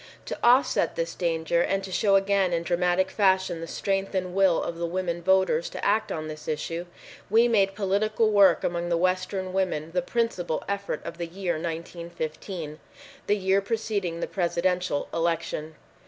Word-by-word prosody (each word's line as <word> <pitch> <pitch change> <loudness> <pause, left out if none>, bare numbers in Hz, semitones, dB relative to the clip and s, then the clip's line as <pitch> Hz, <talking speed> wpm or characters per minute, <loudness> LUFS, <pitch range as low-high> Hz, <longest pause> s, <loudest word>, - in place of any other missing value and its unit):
To - - -5
offset 250 +3 +4
this - - -2
danger 170 -1 0
and 195 +2 0
to 190 - -7
show 195 +2 +3
again 195 -2 +2
in 170 0 0
dramatic 180 +2 +1
fashion 190 -4 +2
the 165 - -5
strength 195 +2 -2
and 180 -1 -1
will 190 -3 +3
of 170 0 -5
the 170 - -1
women 175 -1 -2
voters 190 - +2
to - - -6
act 220 - +2
on 155 -1 -3
this 155 0 -8
issue, 165 +3 -3 0.4
we 230 +3 +5
made 195 -4 +2
political 215 +2 +1
work 200 -2 +5
among 175 0 -1
the 170 - +2
western 185 +1 -1
women 175 -5 -1
the 180 +1 0
principal 180 -5 -1
effort 200 -5 -3
of 170 - -7
the 170 - -3
year 180 +1 -2
1915, 165 0 -5 0.5
the 205 - +3
year 190 0 +2
preceding 200 -5 -2
the - - 0
presidential 180 -3 0
election. 165 -2 -2
185 Hz, 170 wpm, -26 LUFS, 170-195 Hz, 0.5 s, we